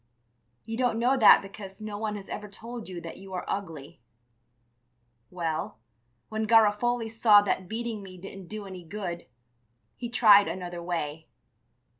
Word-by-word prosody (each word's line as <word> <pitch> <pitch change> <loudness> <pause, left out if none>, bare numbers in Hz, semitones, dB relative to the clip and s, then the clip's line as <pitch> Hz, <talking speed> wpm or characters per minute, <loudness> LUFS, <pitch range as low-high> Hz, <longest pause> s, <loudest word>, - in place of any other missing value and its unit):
You 225 0 -4
don't 245 -3 +1
know 245 +3 +3
that 230 -6 +7
because 195 0 -10
no 215 -1 -6
one 215 -1 -2
has 200 -1 -8
ever 210 - -6
told 230 +2 -8
you 180 -2 -6
that 170 - -8
you 190 0 -11
are 180 - -4
ugly. 160 -11 -5 1.3
Well, 160 -9 -3 0.5
when 220 0 -2
Garofoli 225 +2 +3
saw 220 -2 +5
that 185 -2 -2
beating 225 -1 -4
me 185 -2 -11
didn't 195 0 -10
do 215 +1 -7
any 185 -2 -9
good, 175 -1 -6 0.7
he 240 - -6
tried 210 -4 +6
another 175 -2 -5
way. 160 -3 -4
205 Hz, 150 wpm, -28 LUFS, 180-225 Hz, 1.3 s, that